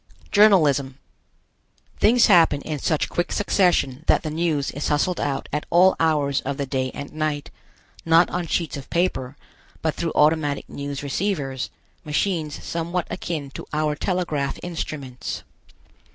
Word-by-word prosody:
JOURNALISM. 150 -11 +4 1.0
Things 235 +3 +5
happen 165 -7 +5
in 150 -1 -4
such 155 +2 0
quick 175 - -2
succession 175 -9 +1
that - - +4
the 155 - -3
news 155 -3 0
is 145 - -3
hustled 160 +4 +1
out 140 -1 -2
at 150 - -2
all 185 +2 +5
hours 150 -4 +2
of 140 0 -4
the 140 - -2
day 130 -1 -1
and 140 - -7
night; 155 -2 -2 0.5
not 165 +1 +5
on 175 -1 -2
sheets 165 0 -1
of 140 -2 -8
paper, 150 -6 -1 0.5
but 160 -1 +1
through 165 -1 -2
automatic 150 -2 +2
news 140 0 -5
receivers, 140 -4 -2 0.3
machines 155 0 -1
somewhat 170 +1 -2
akin 155 -6 -4
to - - -8
our 150 0 +1
telegraph 155 -6 -1
instruments. 150 -7 -5
155 Hz, 140 wpm, -23 LUFS, 140-175 Hz, 1.0 s, Things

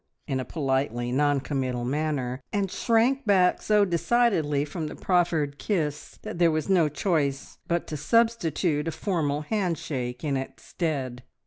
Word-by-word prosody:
in 135 -3 -2
a 130 - -3
politely 130 -5 -1
non 145 +2 +2
committal 130 -3 -2
manner, 135 -2 -2
and 200 -3 -1
shrank 245 +4 +2
back 190 -4 +3
so 210 -1 +3
decidedly 170 -6 +2
from 155 +1 -4
the - - -7
proffered 165 -6 +1
kiss 150 -2 -2
that - - -6
there 170 -1 +5
was 155 -1 -1
no 175 -6 +4
choice 145 -4 -1
but 170 0 0
to 155 - -5
substitute 170 - +1
a - - 0
formal 155 -6 -1
handshake 150 - -2
in 145 -3 0
its 135 0 -5
stead. 135 -7 -3
155 Hz, 150 wpm, -26 LUFS, 140-180 Hz, -, there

